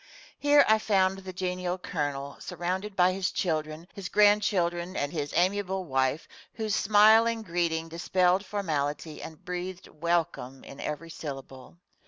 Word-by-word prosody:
Here 290 Hz, 0 st, +5 dB
I 220 Hz, 0 st, +5 dB
found 195 Hz, -3 st, +2 dB
the 190 Hz, -1 st, -8 dB
genial 180 Hz, 0 st, -2 dB
Colonel, 145 Hz, -6 st, -3 dB
surrounded 190 Hz, +4 st, -4 dB
by 185 Hz, 0 st, +4 dB
his 190 Hz, 0 st, -1 dB
children, 155 Hz, -1 st, -2 dB
his 195 Hz, -2 st, -6 dB
grandchildren, 195 Hz, -4 st, +2 dB
and 145 Hz, -, -1 dB
his 145 Hz, -3 st, -3 dB
amiable 190 Hz, +1 st, +1 dB
wife, 135 Hz, +1 st, 0 dB, 0.3 s
whose 220 Hz, -2 st, -1 dB
smiling 220 Hz, +2 st, +5 dB
greeting 165 Hz, -3 st, -1 dB
dispelled 180 Hz, +3 st, +1 dB
formality 155 Hz, -6 st, -3 dB
and 160 Hz, -2 st, -10 dB
breathed 180 Hz, +1 st, -5 dB
"Welcome" 165 Hz, -5 st, -2 dB
in 140 Hz, -, -11 dB
every 165 Hz, +2 st, -5 dB
syllable. 135 Hz, -2 st, -8 dB
180 Hz, 135 wpm, -28 LUFS, 155-195 Hz, 0.3 s, Here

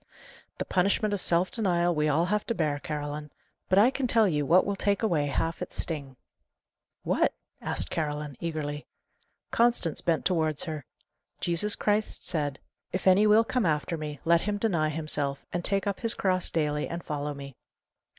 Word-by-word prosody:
"The -, -, -3 dB
punishment 200 Hz, +3 st, +1 dB
of 200 Hz, -, -2 dB
self 175 Hz, +2 st, +4 dB
denial 175 Hz, -6 st, +1 dB
we 150 Hz, -1 st, +1 dB
all 160 Hz, +4 st, +2 dB
have 210 Hz, +3 st, 0 dB
to 230 Hz, -, -1 dB
bear, 150 Hz, -5 st, 0 dB
Caroline. 150 Hz, 0 st, -5 dB, 0.4 s
But 185 Hz, -, +3 dB
I 225 Hz, +6 st, +6 dB
can 270 Hz, -2 st, -1 dB
tell 225 Hz, -2 st, +4 dB
you 150 Hz, -5 st, 0 dB
what 180 Hz, +5 st, +5 dB
will 200 Hz, -, -1 dB
take 200 Hz, +2 st, 0 dB
away 160 Hz, -9 st, +2 dB
half 165 Hz, +3 st, -2 dB
its -, -, -5 dB
sting." 140 Hz, -5 st, -3 dB, 0.9 s
"What?" -, -, +1 dB, 0.3 s
asked -, -, -1 dB
Caroline, 150 Hz, -2 st, -3 dB
eagerly. 150 Hz, -3 st, -4 dB, 0.6 s
Constance 235 Hz, -9 st, +2 dB
bent 165 Hz, -2 st, 0 dB
towards 160 Hz, -5 st, +1 dB
her. 155 Hz, -5 st, -5 dB, 0.5 s
"Jesus 175 Hz, +5 st, 0 dB
Christ 210 Hz, +1 st, -1 dB
said, 150 Hz, -6 st, -1 dB, 0.3 s
'If 185 Hz, -, -3 dB
any 190 Hz, +3 st, +6 dB
will 215 Hz, +2 st, +6 dB
come 250 Hz, +1 st, 0 dB
after 155 Hz, +2 st, 0 dB
me, 150 Hz, -2 st, -6 dB
let 170 Hz, 0 st, +4 dB
him 205 Hz, 0 st, -1 dB
deny 175 Hz, -8 st, +1 dB
himself, 145 Hz, -3 st, -2 dB
and 175 Hz, -, -1 dB
take 195 Hz, +1 st, +1 dB
up 200 Hz, -2 st, -2 dB
his 230 Hz, 0 st, 0 dB
cross 185 Hz, -2 st, +1 dB
daily, 150 Hz, -2 st, 0 dB
and 170 Hz, 0 st, -5 dB
follow 150 Hz, -1 st, -3 dB
me. 140 Hz, -2 st, -9 dB
170 Hz, 175 wpm, -28 LUFS, 150-200 Hz, 0.9 s, I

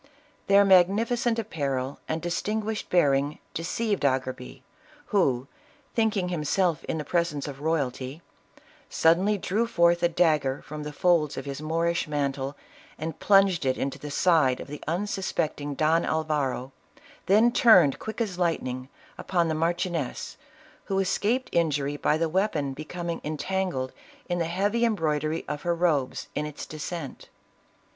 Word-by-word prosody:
Their 200 Hz, 0 st, +6 dB
magnificent 220 Hz, +6 st, +3 dB
apparel 140 Hz, -, -3 dB
and 160 Hz, +1 st, -3 dB
distinguished 210 Hz, +5 st, -2 dB
bearing 145 Hz, -4 st, +2 dB, 0.2 s
deceived 200 Hz, +4 st, -2 dB
Agerbi, 130 Hz, -2 st, -2 dB, 0.5 s
who, 135 Hz, -11 st, +2 dB, 0.5 s
thinking 215 Hz, -5 st, +1 dB
himself 170 Hz, +1 st, 0 dB
in -, -, -2 dB
the 150 Hz, -, -4 dB
presence 170 Hz, -4 st, -1 dB
of 140 Hz, -1 st, -8 dB
royalty, 145 Hz, -1 st, -2 dB, 0.7 s
suddenly 185 Hz, +6 st, +3 dB
drew 210 Hz, +5 st, 0 dB
forth 170 Hz, -5 st, +3 dB
a 170 Hz, -, +3 dB
dagger 155 Hz, -6 st, +1 dB
from 150 Hz, 0 st, -7 dB
the 150 Hz, 0 st, -5 dB
folds 160 Hz, -1 st, +2 dB
of 135 Hz, -, -5 dB
his 140 Hz, +1 st, -5 dB
Moorish 165 Hz, +2 st, 0 dB
mantle 140 Hz, -2 st, -2 dB, 0.4 s
and 160 Hz, 0 st, -5 dB
plunged 195 Hz, -4 st, +4 dB
it 130 Hz, -1 st, +1 dB
into 135 Hz, -, -3 dB
the 150 Hz, -, -7 dB
side 145 Hz, -5 st, +3 dB
of -, -, -7 dB
the 150 Hz, -, -8 dB
unsuspecting 165 Hz, -5 st, -2 dB
Don 160 Hz, +3 st, +2 dB
Alvaro, 150 Hz, -5 st, -1 dB, 0.6 s
then 220 Hz, +5 st, +5 dB
turned, 185 Hz, -, +6 dB
quick 220 Hz, -, -6 dB
as 190 Hz, -6 st, -2 dB
lightning, 130 Hz, -7 st, -1 dB, 0.3 s
upon 175 Hz, -3 st, 0 dB
the -, -, 0 dB
marchioness, 165 Hz, -2 st, -2 dB, 0.5 s
who 195 Hz, -, -1 dB
escaped 205 Hz, +6 st, 0 dB
injury 145 Hz, -4 st, +1 dB
by 150 Hz, +1 st, +1 dB
the 165 Hz, +1 st, +1 dB
weapon 160 Hz, -6 st, 0 dB
becoming 170 Hz, +4 st, -5 dB
entangled 155 Hz, -3 st, -2 dB, 0.3 s
in 175 Hz, -1 st, -1 dB
the 170 Hz, -, +1 dB
heavy 200 Hz, +7 st, 0 dB
embroidery 160 Hz, -7 st, 0 dB
of 150 Hz, -1 st, -4 dB
her 175 Hz, 0 st, 0 dB
robes, 155 Hz, -7 st, 0 dB
in 150 Hz, +1 st, -2 dB
its 150 Hz, -, -7 dB
descent. 155 Hz, -1 st, -7 dB
165 Hz, 140 wpm, -26 LUFS, 145-185 Hz, 0.7 s, Their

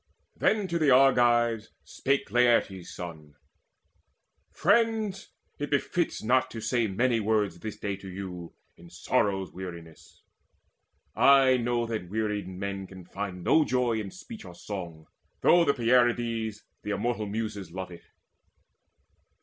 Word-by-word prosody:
Then 210 Hz, -3 st, +1 dB
to 170 Hz, 0 st, 0 dB
the 155 Hz, -3 st, +3 dB
Argives 120 Hz, -4 st, +4 dB
spake 140 Hz, -6 st, -1 dB
Laertes' 115 Hz, -6 st, +2 dB
son: 80 Hz, -4 st, -9 dB, 1.1 s
"Friends, 215 Hz, 0 st, +1 dB, 0.3 s
it 145 Hz, -, -3 dB
befits 160 Hz, +4 st, -1 dB
not 125 Hz, +3 st, +2 dB
to 115 Hz, -, -7 dB
say 115 Hz, +1 st, 0 dB
many 115 Hz, +4 st, +1 dB
words 105 Hz, -5 st, 0 dB
This 110 Hz, +2 st, -6 dB
day 100 Hz, -1 st, -3 dB
to 95 Hz, -1 st, -10 dB
you, 90 Hz, -2 st, -7 dB, 0.2 s
in 85 Hz, 0 st, -15 dB
sorrow's 95 Hz, +1 st, -1 dB
weariness. 85 Hz, -3 st, -10 dB, 0.9 s
I 135 Hz, -2 st, +6 dB
know 120 Hz, 0 st, 0 dB
that 110 Hz, -6 st, -4 dB
wearied 105 Hz, -2 st, -2 dB
men 95 Hz, +1 st, -5 dB
can 95 Hz, -2 st, -12 dB
find 95 Hz, -1 st, -6 dB
no 160 Hz, -, +4 dB
joy 125 Hz, -4 st, 0 dB
In 105 Hz, -2 st, -5 dB
speech -, -, -11 dB
or 90 Hz, -1 st, -11 dB
song, 85 Hz, -6 st, -7 dB, 0.4 s
though 175 Hz, 0 st, +6 dB
the 140 Hz, -, +3 dB
Pierides, 115 Hz, -3 st, +1 dB, 0.2 s
The 105 Hz, -, -7 dB
immortal 110 Hz, 0 st, -1 dB
Muses, 105 Hz, -3 st, -4 dB
love 95 Hz, +1 st, -6 dB
it. 85 Hz, -, -12 dB
110 Hz, 135 wpm, -28 LUFS, 95-125 Hz, 1.1 s, I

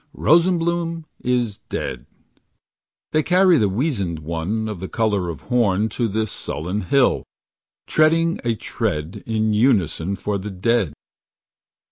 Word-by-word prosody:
Rosenbloom 170 Hz, 0 st, +2 dB, 0.2 s
is 120 Hz, -4 st, 0 dB
dead. 60 Hz, 0 st, -4 dB, 1.0 s
They 155 Hz, -, +3 dB
carry 180 Hz, 0 st, +4 dB
the 105 Hz, -, +2 dB
wizened 100 Hz, -, -1 dB
one 85 Hz, +8 st, -3 dB
Of 105 Hz, -4 st, -5 dB
the 95 Hz, -, -5 dB
color 105 Hz, -6 st, 0 dB
of 80 Hz, -, -6 dB
horn 110 Hz, -4 st, +1 dB
To 115 Hz, +2 st, -1 dB
the 110 Hz, +1 st, -1 dB
sullen 90 Hz, 0 st, -4 dB
hill. 130 Hz, +8 st, +2 dB, 0.6 s
Treading 165 Hz, +2 st, +3 dB
a 115 Hz, -1 st, 0 dB
tread 90 Hz, -8 st, -3 dB
In 110 Hz, -1 st, +1 dB
unison 100 Hz, -, +2 dB
for 100 Hz, +1 st, -2 dB
the 105 Hz, +3 st, -5 dB
dead. 95 Hz, -3 st, 0 dB
110 Hz, 125 wpm, -21 LUFS, 95-135 Hz, 1.0 s, carry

